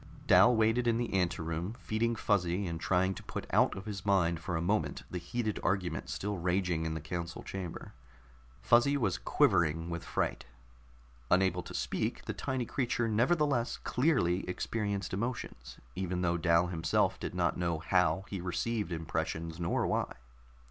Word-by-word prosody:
Dal 125 - +6
waited 115 +2 +2
in 115 0 +2
an 120 - -2
anteroom, 85 +1 -1
feeding 115 0 -1
Fuzzy 100 -3 +1
and 85 -2 -4
trying 95 +1 +2
to - - -9
put - - -6
out - - +3
of 95 - -7
his 100 -2 -5
mind 90 -5 +2
for 85 +1 -3
a - - -1
moment 100 +5 0
the 90 - -3
heated 110 +4 -2
argument 90 -4 -1
still 100 -1 -3
raging 90 -2 0
in 80 - -3
the - - -3
council 85 +2 -5
chamber. 95 -4 -6 0.7
Fuzzy 120 +4 +4
was 105 -9 0
quivering 80 0 +2
with 85 0 -4
fright; - - -2 0.8
unable 90 -1 +3
to 90 - -9
speak, - - -2
the - - -3
tiny 130 -2 -2
creature 120 -2 0
nevertheless 125 +2 +2
clearly 120 - +1
experienced 100 0 -2
emotions, 120 +6 -4 0.2
even 90 -1 -2
though 85 0 +2
Dal 85 0 +3
himself 80 -2 +1
did - - -5
not - - +1
know 85 -2 0
how 95 +4 +1
he 95 -3 -5
received 95 +3 -2
impressions, 80 0 -3
nor 85 0 0
why. - - -1
95 Hz, 160 wpm, -32 LUFS, 85-110 Hz, 0.8 s, Dal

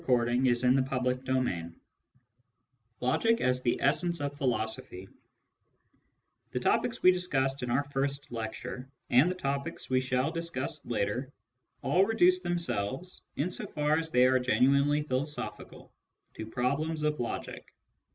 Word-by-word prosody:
t - - -21
Digitized 125 +1 +3
by 135 - -1
Google 125 0 +1
LECTURE 130 0 -1
II 85 -1 -4 1.3
LOGIC 225 - +2
AS 125 0 +1
THE 120 -2 0
ESSENCE 170 +4 +1
OF 145 0 -3
PHILOSOPHY 110 - -3 1.4
The - - -2
topics - - 0
we 185 - +8
discussed 140 -8 0
in 125 - -3
our 135 +4 +2
first 140 0 -3
lecture, 120 +3 -5 0.2
and 130 +8 +6
the 185 - -2
topics 140 -5 -4
we 130 0 +3
shall 130 +3 0
discuss 165 -3 -4
later, 120 +4 -2 0.5
all 185 - +4
reduce 185 -4 +4
themselves, 175 - -3
in 165 +6 -1
so - - -5
far 150 +1 +1
as 160 0 -2
they 125 -4 +4
are 130 0 +4
genuinely 140 +3 +3
philosophical, 145 +2 -5 0.4
to 110 - -7
problems 140 +7 -1
of 150 0 0
logic. 120 - -5
135 Hz, 140 wpm, -30 LUFS, 125-155 Hz, 1.4 s, we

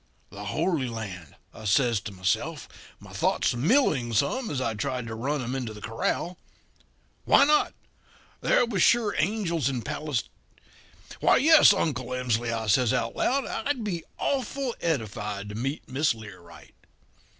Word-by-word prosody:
"'The 105 +1 -8
Holy 155 - 0
Land,' 95 -9 -7 0.2
I 110 - -11
says 115 +2 +3
to 105 - -8
myself, 95 0 -2 0.3
my - - -13
thoughts - - +1
milling 135 - +2
some 220 - +1
as 140 - -2
I 115 -3 -1
tried 125 +4 -3
to 110 - -6
run 135 +5 -2
'em 125 +2 -4
into 125 -5 -4
the - - -9
corral. 115 - -2 0.9
'Why - - +6
not? 300 +1 +2 0.7
There - - +3
was 205 -6 -1
sure 230 -1 +4
angels 170 - 0
in 125 -4 -3
Pales 150 -5 -2 1.0
Why, - - +4
yes, 310 -2 +7
Uncle 145 -11 -1
Emsley,' 120 -2 0
I 115 -1 -2
says 120 +3 +3
out 115 -2 -2
loud, 270 +1 +1
'I'd 250 +1 -2
be 175 -6 -3
awful 270 -2 -1
edified 105 -9 -3
to - - -7
meet 135 +7 -3
Miss 135 0 +1
Learight.' 90 -7 -13
130 Hz, 150 wpm, -26 LUFS, 110-175 Hz, 1.0 s, yes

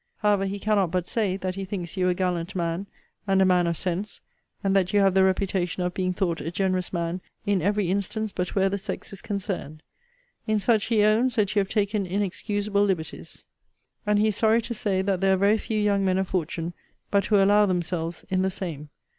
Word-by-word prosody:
However, 205 -2 +2
he 200 +1 -3
cannot 200 -3 +1
but 180 0 -1
say, 200 -5 0
that 185 -1 -3
he 195 +1 -5
thinks 185 -3 -5
you 185 -1 +2
a 180 - +1
gallant 180 0 -2
man, 170 +2 -2 0.4
and 195 -1 +3
a 190 - +5
man 180 -2 +3
of 170 -1 -1
sense; 190 +3 -3 0.4
and 195 0 +2
that 190 -1 +2
you 205 - +5
have 195 -2 +4
the 190 0 +5
reputation 185 -2 0
of 180 0 -1
being 185 0 -1
thought 180 -3 -1
a 160 - -3
generous 185 0 -1
man 170 +1 -2 0.2
in 200 -3 +1
every 200 0 +1
instance 200 +2 -2
but 180 -1 -3
where 195 -1 +3
the 200 +1 -1
sex 195 0 -6
is 195 - -8
concerned. 185 -7 -4 0.6
In 215 0 +2
such, 215 0 +2
he 220 -3 +2
owns, 225 +4 +3
that 210 -1 +1
you - - +4
have 195 -1 0
taken 205 -2 0
inexcusable 205 +2 0
liberties. 185 -6 -3 0.6
And 210 -1 +2
he 215 +1 +3
is 210 - -2
sorry 225 +1 +3
to 235 - -4
say, 195 -4 0
that 195 -2 0
there 195 0 +4
are - - +2
very 205 +3 +3
few 215 0 -2
young 200 -1 +2
men 185 -1 +2
of 190 0 0
fortune 170 -1 -2 0.4
but 200 -1 +2
who 215 - +3
allow 205 +1 +5
themselves 175 -2 -2
in 185 -1 +2
the 190 - +1
same. 165 -6 -6
195 Hz, 220 wpm, -25 LUFS, 180-205 Hz, 0.6 s, a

